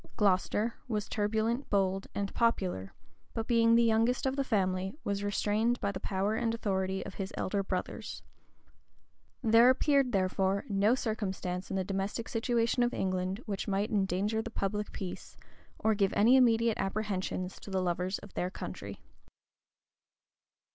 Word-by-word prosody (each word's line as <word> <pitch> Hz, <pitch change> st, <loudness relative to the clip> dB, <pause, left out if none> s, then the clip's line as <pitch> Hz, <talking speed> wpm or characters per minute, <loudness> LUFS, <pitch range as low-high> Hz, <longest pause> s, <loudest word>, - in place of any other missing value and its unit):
Glocester 205 Hz, +3 st, +2 dB
was 210 Hz, -4 st, -2 dB
turbulent, 220 Hz, +5 st, -1 dB
bold, 195 Hz, -1 st, +1 dB
and 200 Hz, -1 st, -2 dB
popular; 185 Hz, -, 0 dB, 0.4 s
but 225 Hz, -, -2 dB
being 230 Hz, -1 st, +4 dB
the 235 Hz, -, +5 dB
youngest 230 Hz, +3 st, +2 dB
of 265 Hz, 0 st, +1 dB
the 275 Hz, -, +1 dB
family, 190 Hz, -4 st, 0 dB
was 200 Hz, 0 st, -2 dB
restrained 210 Hz, +4 st, +1 dB
by 200 Hz, -, -1 dB
the 185 Hz, -, -5 dB
power 195 Hz, +2 st, -1 dB
and 230 Hz, 0 st, 0 dB
authority 190 Hz, -3 st, -1 dB
of -, -, -7 dB
his 190 Hz, 0 st, -5 dB
elder 200 Hz, +1 st, 0 dB
brothers. 185 Hz, -2 st, -4 dB, 1.2 s
There 230 Hz, +2 st, +6 dB
appeared, 275 Hz, 0 st, +3 dB
therefore, 190 Hz, 0 st, +1 dB
no 205 Hz, +3 st, +3 dB
circumstance 195 Hz, -6 st, -3 dB
in 195 Hz, -, -3 dB
the 190 Hz, -, 0 dB
domestic 195 Hz, +4 st, -3 dB
situation 235 Hz, +1 st, +1 dB
of 240 Hz, 0 st, +1 dB
England 185 Hz, +3 st, -1 dB
which 200 Hz, -1 st, -3 dB
might 200 Hz, +2 st, 0 dB
endanger 205 Hz, +2 st, +1 dB
the 230 Hz, -, -6 dB
public 210 Hz, -1 st, -2 dB
peace, 185 Hz, -2 st, -7 dB, 0.4 s
or 220 Hz, -, +2 dB
give 200 Hz, -2 st, +1 dB
any 230 Hz, +5 st, +6 dB
immediate 230 Hz, -3 st, +4 dB
apprehensions 195 Hz, -2 st, -2 dB
to -, -, -10 dB
the 190 Hz, -1 st, 0 dB
lovers 180 Hz, +2 st, -1 dB
of 205 Hz, -, -13 dB
their 180 Hz, -, -1 dB
country. -, -, -7 dB
205 Hz, 150 wpm, -31 LUFS, 190-230 Hz, 1.2 s, There